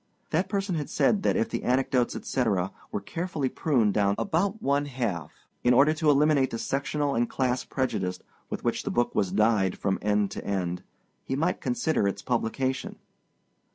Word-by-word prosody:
That 170 +5 +1
person 200 -2 -1
had 150 -3 -3
said 205 - +2
that - - +2
if 230 0 +1
the - - -3
anecdotes, 125 -1 +1
etc., 100 -8 0 0.2
were 105 - -2
carefully 160 - -2
pruned 120 -11 +1
down 100 0 +2
about 200 +4 0
one 140 -5 +1
half, 115 - -3 0.3
in 125 0 +5
order 145 +4 +6
to 155 -1 +1
eliminate 145 -1 +4
the 115 - -4
sectional 140 +4 -1
and 120 -1 +1
class 125 -1 0
prejudice 95 -9 -2 0.3
with - - -5
which - - 0
the - - -4
book 120 - +1
was 95 -3 +1
dyed 105 -2 +2
from 95 -1 -1
end 105 -1 +1
to - - -6
end, 90 -3 -2 0.4
he 135 - -2
might 165 +6 0
consider 160 - +1
its 100 0 -3
publication. 130 +2 -1
130 Hz, 175 wpm, -27 LUFS, 105-150 Hz, 0.4 s, order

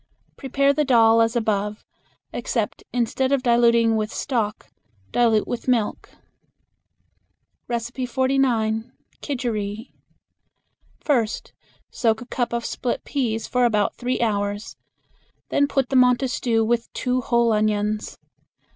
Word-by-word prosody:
Prepare 275 +1 +1
the 300 +1 +1
dal 230 -4 +5
as 225 +1 +1
above, 210 -2 -1 0.5
except - - -2
instead 250 +2 0
of 275 -2 +1
diluting 235 -2 +4
with 215 0 -1
stock 225 -6 -3 0.4
dilute 225 -3 +2
with 245 - -5
milk. 235 -4 0 1.6
49. 240 -1 0 0.3
Kidgeri. 225 -6 -3 1.1
First 235 -7 -1 0.4
soak 225 -2 +1
a 245 - -9
cup 240 -1 -2
of 235 0 -2
split 245 - -3
peas 225 -6 -2
for 250 0 +1
about 210 -4 +2
three 250 +1 -2
hours. 205 -2 -1 0.7
Then 285 - +2
put 270 -3 0
them 260 -2 +6
on 250 -1 +4
to 265 - -2
stew 230 -3 0
with 235 +1 -1
two 255 0 -1
whole 235 -1 +2
onions. 210 0 -1
235 Hz, 120 wpm, -23 LUFS, 220-255 Hz, 1.6 s, them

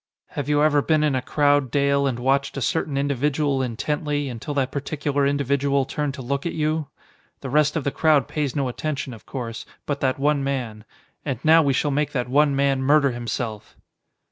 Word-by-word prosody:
"Have 145 0 -4
you 150 0 +3
ever 150 -1 +4
been 155 +1 +2
in 150 -2 +2
a 130 - 0
crowd, 145 0 +2
Dale, 140 +1 +2
and 130 -3 -1
watched 135 +3 0
a - - 0
certain 145 +1 -1
individual 140 0 0
intently, 145 +4 -2
until 125 +4 -5
that 135 -2 0
particular 145 0 -1
individual 140 0 +1
turned 145 0 -3
to 135 - -7
look 140 +3 -2
at 170 - -3
you? 155 -1 -1 0.5
The 135 - -5
rest 150 +1 +3
of 160 - -1
the 140 - -1
crowd 150 -3 +3
pays 150 -5 -2
no 140 -3 0
attention, 140 +1 -4
of 115 - -14
course, 115 -4 -5 0.2
but 145 -1 -2
that 130 -2 0
one 145 0 +1
man. 120 -6 -3 0.4
And 135 -5 -2
now 160 +1 +7
we 140 -3 +2
shall 145 +3 0
make 145 +1 0
that 125 -2 -1
one 145 +2 +3
man 135 -1 +2
murder 140 0 +4
himself!" 120 -2 -5
140 Hz, 195 wpm, -23 LUFS, 130-150 Hz, 0.5 s, now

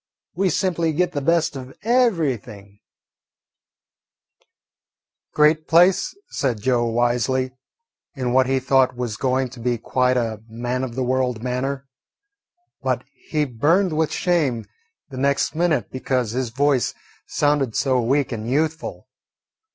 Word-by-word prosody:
we 190 +1 +1
simply 170 -3 0
git 180 +4 +1
the 145 - -3
best 165 +1 +1
of 130 0 -9
everything." 140 - 0 2.5
"Great 155 +1 +3
place," 180 - +4
said 125 -6 -1
Joe 120 +1 +1
wisely, 120 +2 +1 0.6
in 125 -3 -2
what 130 0 +4
he 135 0 +2
thought 130 -1 +3
was 120 -3 -3
going 130 +2 0
to 125 0 -12
be 120 0 0
quite 125 +2 +1
a 110 -3 -2
man 120 +3 -3
of 120 -3 -5
the 130 - -1
world 125 -2 0
manner. 135 +2 -2 0.9
But - - -1
he 155 - -2
burned 155 - +2
with 160 0 +1
shame 145 -11 0 0.5
the 130 - -7
next 140 +1 +1
minute 160 - 0
because 130 -3 -1
his 125 0 -2
voice 135 +1 +1 0.3
sounded 145 -5 +1
so 130 -2 +2
weak 135 +5 +1
and 115 -1 -4
youthful. 155 +4 -2
130 Hz, 130 wpm, -22 LUFS, 125-155 Hz, 2.5 s, place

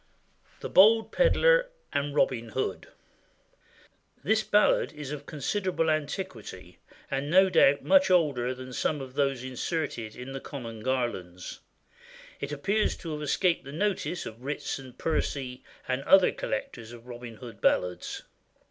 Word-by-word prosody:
THE - - -3
BOLD 220 +4 +6
PEDLAR - - +4 0.2
AND 140 0 -1
ROBIN 120 -5 +1
HOOD. - - -3 1.4
[THIS 220 +7 +3
ballad 210 0 +3
is 150 -2 -7
of 145 -1 -7
considerable 165 +2 -1
antiquity, 140 - -5 0.3
and 140 +1 -2
no 190 +3 +5
doubt 140 -3 +5
much 285 -5 +5
older 140 -8 +2
than 130 0 -9
some 150 +4 0
of 130 -2 -8
those 135 -3 0
inserted 130 -4 -3
in 125 +2 -8
the 135 - -4
common 115 -5 -7
Garlands. 110 -8 -3 0.8
It 140 - -4
appears 200 +9 0
to 165 - -7
have 150 - -5
escaped 165 +4 +1
the 140 - -9
notice 185 +1 -1
of 115 +3 -9
Ritson, 135 -2 -4
Percy, 130 -3 -2 0.2
and 130 +1 -1
other 190 -1 +6
collectors 115 +1 -5
of 120 0 -12
Robin 120 -2 -9
Hood 115 +1 -11
ballads. 90 -1 0
140 Hz, 140 wpm, -28 LUFS, 125-170 Hz, 1.4 s, BOLD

